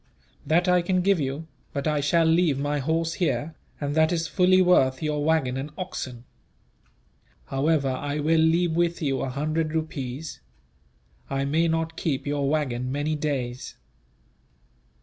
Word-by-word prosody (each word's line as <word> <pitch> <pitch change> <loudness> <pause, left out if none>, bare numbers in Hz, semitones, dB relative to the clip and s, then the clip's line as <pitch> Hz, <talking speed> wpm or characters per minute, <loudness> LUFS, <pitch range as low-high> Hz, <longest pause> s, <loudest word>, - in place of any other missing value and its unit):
"That 170 +5 +3
I 180 0 +4
can 185 +1 +1
give 195 -2 +3
you; 140 +3 -3 0.3
but 140 +1 -2
I 150 -1 +1
shall 165 +4 +2
leave 160 -3 +3
my 145 +1 -1
horse 165 +4 0
here, 165 -3 -1 0.3
and 145 -1 -2
that 160 +1 +3
is 165 -2 0
fully 185 +2 +4
worth 155 -7 +3
your 150 -1 -1
waggon 145 -5 +1
and 135 +3 -4
oxen. 130 -10 -6 1.2
However, 140 +1 +1
I 145 +3 -3
will 160 +2 +2
leave 165 +2 +3
with 170 0 +1
you 135 -2 0
a 135 - -2
hundred 155 +4 -1
rupees. 155 -2 -4 0.9
I 135 0 -1
may 160 +4 +2
not 165 0 -1
keep 140 -5 -2
your 145 -1 0
waggon 130 -5 -1
many 145 +3 -1
days." 135 -4 -3
155 Hz, 150 wpm, -25 LUFS, 140-165 Hz, 1.2 s, I